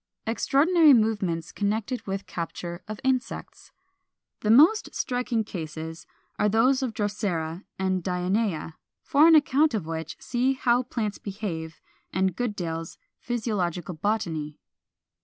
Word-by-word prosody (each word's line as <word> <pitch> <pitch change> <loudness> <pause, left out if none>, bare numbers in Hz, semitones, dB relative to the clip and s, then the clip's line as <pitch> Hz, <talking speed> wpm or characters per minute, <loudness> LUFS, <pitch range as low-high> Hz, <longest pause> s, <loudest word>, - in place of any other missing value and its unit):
476. 225 +1 -2
=Extraordinary 315 +2 +5
Movements 190 -7 -1
connected 215 +4 -2
with 195 0 -3
Capture 170 +1 -5
of 215 0 -6
Insects.= 260 -1 -2 0.7
The 210 - -2
most 315 - +5
striking 245 -3 -1
cases 160 -4 -7 0.3
are 210 - +3
those 255 +6 +3
of 245 -4 -2
Drosera 200 -5 -2
and 185 -1 0
Dionæa; 180 -2 -1 0.3
for 305 +1 +5
an 330 - +8
account 295 -2 +4
of 200 -7 -2
which 160 0 -5
see 255 +2 0
"How 245 -2 +2
Plants 220 -5 -3
Behave," 180 -6 -5 0.3
and 190 -1 +1
Goodale's 175 -9 -3 0.2
"Physiological 190 -8 -2
Botany." 160 -5 -2
205 Hz, 120 wpm, -26 LUFS, 170-245 Hz, 0.7 s, an